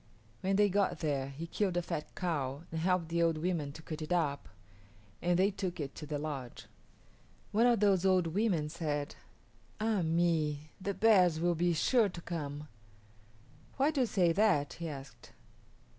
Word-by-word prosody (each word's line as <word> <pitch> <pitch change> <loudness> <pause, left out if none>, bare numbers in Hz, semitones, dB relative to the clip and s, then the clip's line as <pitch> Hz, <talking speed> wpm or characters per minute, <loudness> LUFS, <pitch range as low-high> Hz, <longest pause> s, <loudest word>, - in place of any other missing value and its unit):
When 195 +1 0
they 205 +1 +5
got 200 0 0
there, 140 -4 -1
he 145 +5 -6
killed 185 +1 -1
a 175 - 0
fat 150 - -5
cow 145 -5 -2
and 160 - -3
helped 180 -1 +1
the 170 0 0
old 165 -1 +2
women 160 -3 -1
to 160 - -11
cut 155 0 -6
it 155 - -6
up, 140 - 0 0.7
and 175 0 +2
they 195 +3 +3
took 185 -3 -4
it 140 -2 -4
to 150 - -8
the 150 0 -2
lodge. 140 -5 -6 0.9
One 230 +4 +4
of 235 -4 +3
those 195 -3 +4
old 185 -2 +3
women 170 -3 0
said, 150 -3 -3 0.7
"Ah 215 -2 +1
me, 160 -3 0
the 200 +1 -2
bears 185 -6 +4
will 175 +1 +2
be 170 +1 +1
sure 225 +5 +3
to 175 -2 -9
come." 150 -3 -5 1.1
"Why 280 +3 +3
do 290 -4 0
you 250 - +2
say 180 -6 +3
that?" 180 -7 +2
he 170 -1 -5
asked. 140 -2 -10
170 Hz, 175 wpm, -32 LUFS, 150-190 Hz, 1.1 s, they